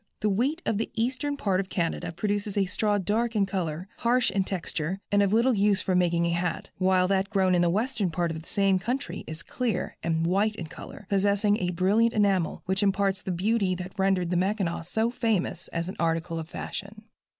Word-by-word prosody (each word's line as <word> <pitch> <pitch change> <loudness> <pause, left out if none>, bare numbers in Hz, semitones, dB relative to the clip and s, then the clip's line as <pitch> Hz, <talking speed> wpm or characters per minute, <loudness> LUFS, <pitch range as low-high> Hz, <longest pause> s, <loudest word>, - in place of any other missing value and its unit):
The 210 -1 +2
wheat 270 - 0
of 215 - 0
the 225 - -2
eastern 260 +5 -1
part 195 -7 +1
of 190 -1 -3
Canada 170 -1 -2
produces 205 +3 -2
a 195 - +3
straw 205 +3 +1
dark 220 +4 0
in 200 -2 +3
color, 180 -2 -3
harsh 245 +1 +2
in 195 - +1
texture, 180 -1 -3
and 205 0 +4
of 200 -1 +2
little 235 +4 +4
use 205 -1 +3
for 185 - -1
making 175 -2 +2
a 170 - +1
hat, 170 0 -2
while 185 -1 +3
that 195 0 +1
grown 190 -3 +2
in 175 - +3
the 175 - +3
western 210 +1 0
part 170 0 -1
of 160 0 -5
the 165 - -13
same 195 -2 +2
country 245 +8 -3
is 160 +1 -7
clear 250 -3 -2
and 165 0 0
white 200 +5 +2
in 175 - -5
color, 160 - -10
possessing 205 +1 +2
a 180 - -1
brilliant 200 +6 +2
enamel 195 -5 +1
which 190 +1 +1
imparts 195 -1 +1
the - - -6
beauty 190 +1 +1
that 180 +1 -7
rendered 190 -3 +1
the 180 - +2
Mackinaw 190 -2 0
so 220 +7 -1
famous 225 -6 -1
as 170 +1 -3
an 190 - -5
article 165 0 0
of 160 0 -7
fashion. 205 +4 -7
195 Hz, 210 wpm, -27 LUFS, 180-210 Hz, -, and